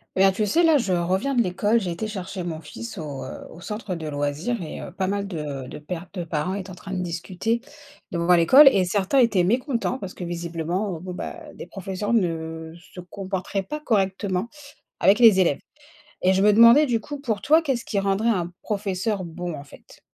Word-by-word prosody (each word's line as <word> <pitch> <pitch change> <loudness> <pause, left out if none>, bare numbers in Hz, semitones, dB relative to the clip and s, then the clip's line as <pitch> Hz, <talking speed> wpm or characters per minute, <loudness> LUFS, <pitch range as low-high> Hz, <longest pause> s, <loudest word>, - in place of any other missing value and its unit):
Bien, 195 +1 +5
tu 210 +3 -1
sais, 325 - +2
là 325 -3 +5
je 210 -8 0
reviens 185 +9 0
de 245 - +3
l'école, 205 +4 +1
j'ai 185 - -3
été 175 +6 -3
chercher 190 -2 -5
mon 165 -2 -5
fils 215 +8 -8
au, 145 -4 -6
heu, - - -8
au 170 - -13
centre 210 -2 -5
de 165 -2 -6
loisirs 150 +10 -2
et 160 - -6
heu, - - -8
pas 190 +1 -2
mal 200 +1 -2
de 150 -7 -5
de - - -8
pères, 170 +4 -6
de 180 -3 -4
parents 160 +2 -2
étaient 195 -1 -5
en 185 - -8
train 195 +1 -8
de 185 - -2
discuter 180 +6 -2 0.5
devant 170 0 +3
l'école, 260 - +8
et 190 -5 +2
certains 195 +6 0
étaient 210 -7 +3
mécontents 245 - 0
parce 195 -7 -7
que - - -8
visiblement, 170 +2 -3
bon, 180 0 -6
bah, 335 - -6 0.2
des - - -8
professeurs 195 +3 -4
ne 160 -5 -1 0.2
se - - -9
comporteraient 190 +1 -4
pas 300 +11 -5
correctement 195 -4 0 0.5
avec 195 +3 +5
les 220 -5 +7
élèves, 170 -6 +2 0.6
et 185 +1 +4
je 190 - +2
me 210 +1 +6
demandais 235 +7 +7
du 240 -4 +1
coup, 285 +6 -8
pour 225 -7 -1
toi, 310 +8 +5
qu'est-ce 270 -7 -2
qui 205 - -1
rendrait 195 +3 0
un 175 -5 0
professeur 200 0 -2
bon, 175 0 -5
en 140 - -8
fait? 140 - -17
190 Hz, 210 wpm, -24 LUFS, 175-215 Hz, 0.6 s, l'école